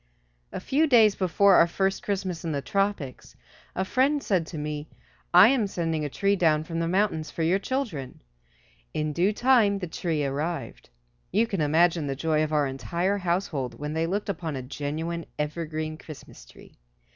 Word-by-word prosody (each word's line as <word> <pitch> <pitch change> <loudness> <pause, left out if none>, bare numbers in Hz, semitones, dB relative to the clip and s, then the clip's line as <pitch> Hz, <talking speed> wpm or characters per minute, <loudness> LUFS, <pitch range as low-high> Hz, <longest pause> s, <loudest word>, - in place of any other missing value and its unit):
A - - -4
few 305 +4 +1
days 225 -6 +6
before 195 +1 +3
our 170 - +6
first 190 +3 -1
Christmas 190 -4 -3
in 165 -2 -2
the 140 - -2
tropics 195 -9 -2 0.4
a 190 - -1
friend 275 +7 +1
said 180 -5 0
to 165 - -7
me, 150 0 -5 0.4
"I 180 +5 +8
am 245 -6 +2
sending 165 -4 -2
a 145 - -2
tree 200 +7 +1
down 155 -5 +2
from 165 +1 -4
the 165 - 0
mountains 185 -4 0
for 165 - -3
your 175 +4 +2
children." 200 - -4 0.8
In 150 -1 -1
due 180 +6 +2
time 225 -3 +3
the 190 - -4
tree 160 -3 -2
arrived. 150 - -4 0.4
You 215 +5 +3
can 195 -7 -3
imagine 160 +1 +2
the 135 - -2
joy 155 +2 +1
of 155 - -3
our 150 -2 +2
entire 170 +9 -1
household 170 -8 -2
when 150 +1 -4
they 160 +1 0
looked 200 +4 -2
upon 165 -6 -3
a 130 - -5
genuine, 155 +5 -4
evergreen, 155 +1 -3
Christmas 140 - -12
tree. - - -17
170 Hz, 180 wpm, -26 LUFS, 150-195 Hz, 0.8 s, I